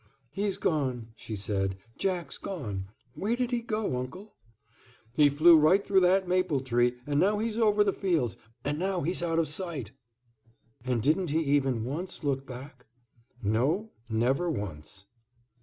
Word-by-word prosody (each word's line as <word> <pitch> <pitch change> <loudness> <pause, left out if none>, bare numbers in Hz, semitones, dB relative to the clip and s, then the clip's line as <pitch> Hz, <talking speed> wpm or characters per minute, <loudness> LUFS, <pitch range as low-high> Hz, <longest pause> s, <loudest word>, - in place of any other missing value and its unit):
"He's 200 0 -2
gone," 130 -7 -1
she 110 0 -7
said, 95 -1 -1 0.2
"Jack's 180 -5 -2
gone. 105 - -5 0.3
Where 215 +5 -1
did 250 0 -1
he 240 -1 0
go, 215 - -2
Uncle?" 185 +12 -7 0.8
"He 145 +2 +5
flew 155 +4 +7
right 160 +6 +4
through 195 -1 +4
that 185 +1 +3
maple 180 -6 +1
tree, 120 -1 +1
and 145 0 0
now 205 +5 +3
he's 225 +1 -2
over 210 -2 +4
the 200 -2 +1
fields, 160 - 0 0.3
and 145 +2 -1
now 190 0 -1
he's 175 +4 +3
out 165 -1 0
of 165 -1 +2
sight." 150 - -3 0.9
"And 125 -3 -1
didn't 165 +4 +2
he 160 +3 +1
even 135 -5 +1
once 170 +8 -4
look 135 -2 -1
back?" 130 0 -10 0.6
"No, 140 - +1 0.2
never 130 +10 +1
once." 95 - -6
150 Hz, 155 wpm, -29 LUFS, 125-190 Hz, 0.9 s, flew